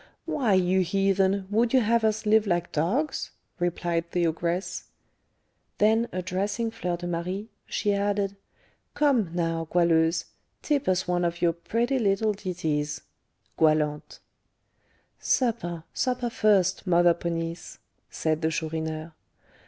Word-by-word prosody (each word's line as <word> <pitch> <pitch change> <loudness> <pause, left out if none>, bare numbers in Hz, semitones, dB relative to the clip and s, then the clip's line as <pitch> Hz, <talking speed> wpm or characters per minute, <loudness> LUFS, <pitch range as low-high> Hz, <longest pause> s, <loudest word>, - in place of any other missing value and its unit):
"Why, 240 -8 +1
you 185 0 +3
heathen, 195 +1 +1
would 230 +3 +2
you 260 - +6
have 230 +1 +2
us 220 0 +1
live 215 0 +4
like 175 -2 0
dogs?" 215 - -1 0.3
replied 175 -1 -1
the 175 -1 +1
ogress. 170 +3 -2 0.9
Then 220 +3 +3
addressing 200 +5 -2
Fleur 180 -5 -3
de 175 - -7
Marie, 180 +5 -3 0.2
she 205 0 0
added, 200 0 0 0.6
"Come, 265 - +2
now, 165 -1 -1
Goualeuse, 165 -1 +2 0.4
tip 290 -2 0
us 185 0 +1
one 180 0 +1
of 170 0 -1
your 170 -1 +2
pretty 235 +10 -1
little 210 0 +2
ditties" 160 -7 -2 0.6
(goualantes). 150 -1 +1 1.0
"Supper, 215 -10 0
supper 250 -2 -1
first, 195 -4 +2
Mother 175 -1 +5
Ponisse," 165 0 -4 0.3
said 160 0 -1
the 160 - +1
Chourineur. 160 0 -4
185 Hz, 120 wpm, -26 LUFS, 170-210 Hz, 1.0 s, you